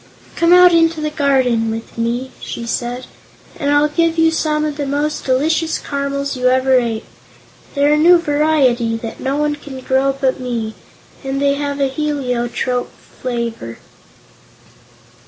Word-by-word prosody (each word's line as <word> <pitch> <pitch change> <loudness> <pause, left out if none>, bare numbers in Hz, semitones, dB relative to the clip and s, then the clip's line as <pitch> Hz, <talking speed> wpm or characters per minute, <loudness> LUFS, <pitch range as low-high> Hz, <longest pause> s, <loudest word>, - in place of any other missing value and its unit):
"Come 335 0 +2
out 360 0 +7
into 330 -1 +3
the 305 0 -2
garden 260 -6 +1
with 225 +1 -6
me," 240 +3 -2
she 235 - -6
said, 245 +2 -3 0.5
"and 285 -3 -1
I'll 290 +1 +4
give 330 +2 0
you 325 0 +4
some 305 -1 0
of 300 -1 -3
the 285 -2 -3
most 290 +2 -2
delicious 315 +5 +1
caramels 280 0 -3
you 255 0 0
ever 260 0 +4
ate. 230 -2 -3 0.7
They're 285 +1 +3
a - - +3
new 345 +3 +6
variety, 290 -7 +1
that 225 0 -7
no 270 +1 -2
one 295 0 0
can 280 -2 -9
grow 265 +1 +1
but 265 -1 0
me, 235 -3 -3 0.5
and 270 0 -2
they 280 0 +2
have 285 0 -3
a 275 - +2
heliotrope 255 -3 -2 0.3
flavor." 235 - -4
275 Hz, 155 wpm, -17 LUFS, 250-300 Hz, 0.7 s, out